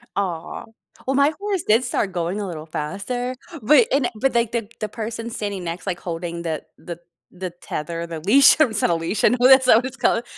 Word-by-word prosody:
Aw. 180 -5 -3 0.4
Well, 265 - +1
my 280 +2 +3
horse 400 -4 -2
did 225 +4 +4
start 205 -5 -1
going 175 +3 -2
a 200 - -3
little 160 -3 -7
faster, 200 +12 -4 0.3
but 300 - +5
and 275 -3 +2
but, 270 -2 +1
like, 235 -1 +1
the 230 -3 -2
the 215 - -3
person 230 +1 -5
standing 205 -4 -4
next, 170 +3 -6
like, 175 -2 -2
holding 170 0 -5
the 160 -2 -3
the 170 -1 -8 0.3
the 185 0 -6
tether 170 -1 -6
the 165 -1 -6
leash, 240 - +6
I 310 - +7
mean 230 - -6
it's 205 - -2
not - - +2
a 170 - +2
leash. 165 +5 -3
And - - +5
who 250 - +6
that's 265 0 +7
what 235 0 +5
it's 265 0 -7
called. 235 - +1
205 Hz, 225 wpm, -22 LUFS, 170-250 Hz, 0.4 s, I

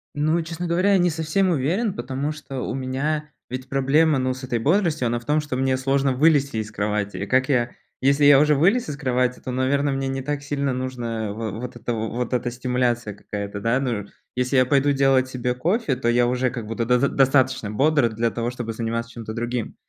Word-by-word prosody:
Ну, 155 +3 +1
честно 170 +2 -5
говоря, 180 +4 +2
я - - +5
не 175 - +3
совсем 160 +4 0
уверен, 175 - 0
потому 135 +1 -3
что 140 -3 -7
у - - -3
меня 145 +4 -2 0.2
ведь 130 +1 -5
проблема 140 +3 +3
ну 130 0 0
с 130 +1 -10
этой 120 -2 -1
бодростью, 160 - +1
она 120 +1 -1
в 120 - -17
том, 150 +1 +2
что 150 -3 -4
мне 130 0 +1
сложно 135 +1 +1
вылезти 140 -2 +3
из 110 0 -3
кровати. 105 -1 -2
И 100 - -3
как 130 +5 +2
я 125 -2 +1 0.3
если 140 +2 +3
я 145 -1 +8
уже 150 0 +4
вылез 195 - +2
из 145 - -4
кровати, 125 -3 0
то, 130 - -6
наверно, 140 +3 +1
мне 135 0 -2
не 135 0 -3
так 145 +1 -3
сильно 140 -1 -1
нужно 120 -4 -3
во 110 0 -4
вот 120 +4 -6
эта 120 +1 -3
во 110 0 -2
вот 125 +1 -3
эта 125 -1 0
стимуляция 120 -3 -1
какая-то, 100 0 -6
да? 115 +4 +1
Ну 135 -2 -1
р 105 -3 -4 0.3
если 125 +2 0
я 130 - +5
пойду 140 +2 +3
делать 135 -2 +3
себе 125 -1 -2
кофе, 170 - 0
то 125 -1 -3
я 120 0 +3
уже 125 0 0
как 115 -4 -6
будто 115 +1 -2
до 125 +1 +3
дос 140 - +2
достаточно 130 -5 +2
бодр 140 +2 +3
для 115 +1 0
того, 120 +1 -3
чтобы 120 -2 -5
заниматься 115 +1 -3
чем-то 115 -3 -7
другим. 120 0 -3
130 Hz, 225 wpm, -23 LUFS, 120-145 Hz, 0.3 s, я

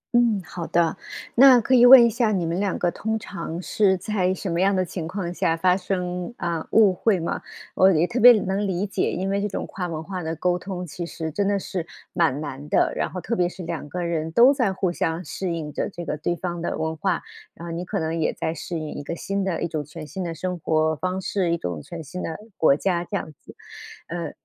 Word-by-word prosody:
嗯， 235 -4 +4
好 170 -2 -6
的。 170 -2 +2 0.4
那 255 0 +8
可 250 - 0
以 245 -1 +8
问 250 -1 +11
一 - - +5
下， 230 -1 +1
你 180 -4 0
们 170 +3 -1
两 200 -2 0
个 175 -1 +1
通 220 +1 -2
常 170 -5 -6
是 195 -3 +2
在 185 -1 0
什 190 +2 -4
么 170 +1 0
样 195 +1 +3
的 185 -1 +1
情 170 -2 -5
况 180 -1 -4
下 165 -2 0
发 180 +2 +3
生， 180 0 -3
啊， 170 -2 -3
误 210 -4 +5
会 195 +1 +1
吗？ 165 - -3 0.3
我 190 +1 +5
也 165 0 +3
特 240 +6 -2
别 245 +1 +10
能 195 +2 -1
理 190 +2 -1
解， 200 - -1
因 190 +2 -2
为 200 0 0
这 210 - 0
种 195 - -4
跨 180 -2 -5
文 160 -2 -5
化 185 +1 -5
的 160 0 -3
沟 180 +2 0
通， 180 -1 -5
其 175 +2 -6
实 160 -2 -5
真 200 +5 0
的 200 0 +2
是 180 -3 -4 0.3
蛮 155 -5 +2
难 145 0 -7
的， - - +2
然 - - -1
后 185 - -6
特 235 +5 -2
别 180 -2 +1
是 180 - -9
两 165 -3 -5
个 180 +3 -3
人 165 -2 -2
都 240 - +6
在 250 -8 +1
互 185 -1 -1
相 165 0 -2
适 185 +4 -3
应 155 -3 -4
着， - - -2
这 175 -3 -8
个 - - -2
对 155 +3 -2
方 175 -1 -4
的 - - -2
文 160 0 -2
化， 190 +5 -1 0.3
然 170 - -9
后 - - -5
你 170 +2 -3
可 - - -3
能 160 +1 -2
也 155 - +1
在 160 - -2
适 170 +1 -5
应 155 -1 -5
一 - - -6
个 165 +4 -5
新 195 +3 -2
的 185 -3 -2
一 - - 0
种 155 -3 -3
全 155 +2 -9
新 190 +5 -5
的 170 -2 -4
生 180 +2 -4
活 160 0 +1
方 185 +4 -2
式、 185 -2 0
一 170 - +1
种 90 - -4
全 165 - -8
新 180 +5 -7
的 160 - -4 0.2
国 140 -3 +5
家， 175 +1 0
这 200 +3 -3
样 155 - -6
子。 - - -14 0.5
呃， 170 0 -4
180 Hz, 270 characters per minute, -24 LUFS, 165-195 Hz, 0.5 s, 问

